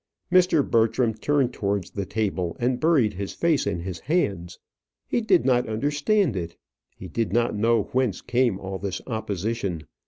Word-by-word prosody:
Mr. 180 Hz, -5 st, +4 dB
Bertram 115 Hz, +1 st, +2 dB
turned 130 Hz, +3 st, 0 dB
towards 100 Hz, -4 st, -2 dB
the 100 Hz, -2 st, -4 dB
table, 95 Hz, -5 st, -2 dB
and 125 Hz, +1 st, 0 dB
buried 150 Hz, -10 st, +3 dB
his 100 Hz, +1 st, -5 dB
face 165 Hz, -4 st, +1 dB
in 85 Hz, -, -2 dB
his 90 Hz, -1 st, -5 dB
hands. 100 Hz, -, -1 dB, 0.5 s
He 240 Hz, -, 0 dB
did 190 Hz, -, +3 dB
not 125 Hz, -3 st, +2 dB
understand 145 Hz, -, +1 dB
it. 85 Hz, -2 st, -5 dB, 0.4 s
He 95 Hz, -, -9 dB
did 105 Hz, +2 st, -2 dB
not 120 Hz, +2 st, +1 dB
know 115 Hz, +1 st, +2 dB
whence 125 Hz, -7 st, 0 dB
came 120 Hz, -5 st, +1 dB
all 95 Hz, 0 st, -5 dB
this 100 Hz, -2 st, -3 dB
opposition. 105 Hz, -5 st, -3 dB
115 Hz, 160 wpm, -25 LUFS, 95-130 Hz, 0.5 s, Mr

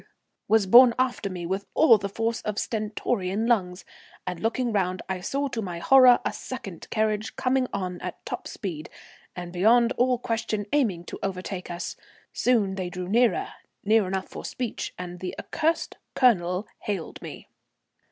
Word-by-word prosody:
was 220 Hz, -2 st, +4 dB
borne 240 Hz, +4 st, +8 dB
after 250 Hz, -5 st, 0 dB
me 180 Hz, -2 st, -5 dB
with 190 Hz, +3 st, -3 dB
all 235 Hz, -9 st, +6 dB
the 200 Hz, -, -3 dB
force 225 Hz, +3 st, -2 dB
of 210 Hz, -1 st, -4 dB
stentorian 210 Hz, -2 st, -1 dB
lungs, 190 Hz, -6 st, 0 dB, 0.4 s
and 180 Hz, -2 st, -4 dB
looking 235 Hz, +3 st, 0 dB
round 185 Hz, -2 st, 0 dB
I 190 Hz, -1 st, -3 dB
saw 280 Hz, +9 st, -1 dB
to 235 Hz, -3 st, -3 dB
my 180 Hz, -4 st, -5 dB
horror 255 Hz, +6 st, +7 dB
a -, -, 0 dB
second 195 Hz, -10 st, -8 dB
carriage 215 Hz, -1 st, -1 dB
coming 255 Hz, 0 st, +1 dB
on 180 Hz, -3 st, -4 dB
at -, -, -7 dB
top -, -, -5 dB
speed, 170 Hz, -7 st, -6 dB, 0.5 s
and 175 Hz, -1 st, -7 dB
beyond 230 Hz, +6 st, +4 dB
all 250 Hz, 0 st, +3 dB
question 225 Hz, -3 st, -2 dB
aiming 215 Hz, -13 st, +1 dB
to -, -, -8 dB
overtake 185 Hz, -1 st, -4 dB
us. 175 Hz, +1 st, -5 dB, 0.4 s
Soon 220 Hz, -6 st, +2 dB
they 185 Hz, -2 st, -3 dB
drew 180 Hz, 0 st, -5 dB
nearer, 240 Hz, -, +2 dB, 0.4 s
near 215 Hz, -1 st, +4 dB
enough 190 Hz, 0 st, -2 dB
for -, -, -9 dB
speech, 245 Hz, -3 st, -4 dB
and 180 Hz, -1 st, -7 dB
the 180 Hz, 0 st, -5 dB
accursed 325 Hz, +1 st, -1 dB, 0.2 s
Colonel 185 Hz, -6 st, +3 dB
hailed 195 Hz, -6 st, -4 dB
me. -, -, -9 dB
205 Hz, 160 wpm, -26 LUFS, 185-240 Hz, 0.5 s, borne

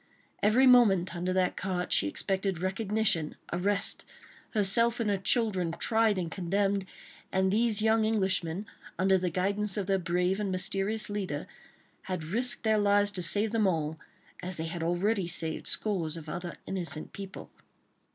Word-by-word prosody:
Every 225 Hz, +6 st, +4 dB
moment 210 Hz, -9 st, +5 dB
under 180 Hz, +2 st, -2 dB
that 185 Hz, -1 st, +1 dB
cart 185 Hz, -2 st, -2 dB
she 100 Hz, -, +3 dB
expected 190 Hz, -, -1 dB
recognition, 195 Hz, -3 st, 0 dB, 0.2 s
arrest, 195 Hz, +3 st, -1 dB, 0.5 s
herself 230 Hz, +4 st, +3 dB
and 215 Hz, -3 st, 0 dB
her 200 Hz, -, +1 dB
children 190 Hz, -6 st, 0 dB
tried 225 Hz, -3 st, +2 dB
and 170 Hz, -3 st, -3 dB
condemned, 195 Hz, +1 st, -1 dB, 0.4 s
and 190 Hz, 0 st, +1 dB
these 220 Hz, -1 st, +1 dB
young 220 Hz, 0 st, +3 dB
Englishmen, 190 Hz, -4 st, 0 dB, 0.3 s
under 190 Hz, 0 st, +3 dB
the 180 Hz, 0 st, -1 dB
guidance 200 Hz, +4 st, -1 dB
of 200 Hz, -, -1 dB
their 195 Hz, 0 st, +1 dB
brave 180 Hz, +2 st, 0 dB
and 205 Hz, -2 st, -2 dB
mysterious 195 Hz, +3 st, +1 dB
leader, 195 Hz, -8 st, -4 dB, 0.6 s
had 180 Hz, -3 st, -3 dB
risked 240 Hz, +10 st, -1 dB
their 220 Hz, -1 st, +2 dB
lives 205 Hz, 0 st, +3 dB
to 190 Hz, -, -5 dB
save 205 Hz, +5 st, +1 dB
them 220 Hz, -3 st, +2 dB
all, 160 Hz, -3 st, -1 dB, 0.4 s
as 180 Hz, 0 st, -3 dB
they 160 Hz, -, -4 dB
had 165 Hz, +1 st, -5 dB
already 180 Hz, +3 st, 0 dB
saved 165 Hz, -2 st, -1 dB
scores 170 Hz, -7 st, +1 dB
of 160 Hz, -1 st, -10 dB
other 175 Hz, +2 st, -5 dB
innocent 175 Hz, -5 st, -2 dB
people. 195 Hz, -1 st, -9 dB
195 Hz, 155 wpm, -29 LUFS, 180-210 Hz, 0.6 s, moment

